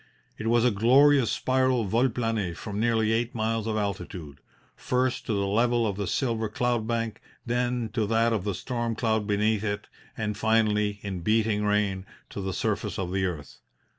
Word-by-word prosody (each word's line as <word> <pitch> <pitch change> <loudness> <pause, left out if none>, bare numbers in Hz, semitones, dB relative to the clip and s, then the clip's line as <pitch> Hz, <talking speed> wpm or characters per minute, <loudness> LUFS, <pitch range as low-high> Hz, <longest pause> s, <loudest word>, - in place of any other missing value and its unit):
It 110 - -3
was 120 +1 +3
a 125 - +4
glorious 130 +5 +5
spiral 130 -2 +1
vol 115 +6 +2
plane 115 -7 -2
from 105 +3 -5
nearly 110 -1 +2
eight 115 +2 0
miles 110 0 -1
of 110 -1 -1
altitude 90 -7 -4 0.4
first, 130 0 -1
to 115 - 0
the 100 -1 0
level 120 +3 +2
of 100 -3 -1
the 100 -1 -3
silver 115 -3 -1
cloud 120 0 -1
bank, 115 -1 -2 0.2
then 120 -1 0
to 110 -3 0
that 115 +1 +2
of 105 -5 -1
the 100 -2 -2
storm 120 -3 -3
cloud 110 -3 0
beneath 105 0 +1
it, 105 -1 -2 0.3
and 105 -2 -2
finally, 105 -1 +2
in 95 -3 -4
beating 105 +2 +1
rain, 100 -2 0 0.2
to 100 - -5
the 95 - -3
surface - - -2
of 90 -2 -3
the 95 0 0
earth. 75 -6 -7
110 Hz, 180 wpm, -27 LUFS, 105-120 Hz, 0.4 s, glorious